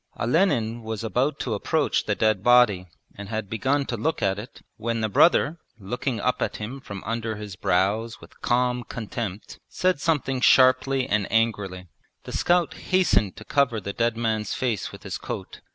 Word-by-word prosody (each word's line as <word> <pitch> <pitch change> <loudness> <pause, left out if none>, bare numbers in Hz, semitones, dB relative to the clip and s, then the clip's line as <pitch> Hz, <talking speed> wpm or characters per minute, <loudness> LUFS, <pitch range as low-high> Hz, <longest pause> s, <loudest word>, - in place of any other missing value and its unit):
Olenin 120 - +1
was 110 -1 -5
about 130 +6 0
to 120 - -2
approach 100 - 0
the - - 0
dead 110 -3 +2
body 120 -7 +5 0.3
and 100 -1 -9
had 110 -3 -4
begun 135 +6 0
to 120 - -3
look 150 +9 -1
at 95 0 +1
it 115 +4 -11
when 115 +1 -2
the 110 - +1
brother, 165 - +4 0.2
looking 115 +4 -3
up 125 +5 0
at - - -1
him 115 +6 -6
from 100 -6 -8
under 115 -1 -3
his 105 -2 -7
brows 100 +6 0
with - - -17
calm 125 0 +1
contempt, 110 -4 -6
said 185 -5 0
something 135 -5 0
sharply 130 +1 +4
and 105 -2 0
angrily. 105 -5 0 0.4
The - - -8
scout 175 -1 +2 0.2
hastened 110 - +3
to 110 - -11
cover 130 -6 +1
the 100 0 -5
dead 115 0 0
man's 110 -2 -1
face 120 -6 -2
with - - -12
his - - -5
coat. - - -7
115 Hz, 175 wpm, -25 LUFS, 105-130 Hz, 0.4 s, body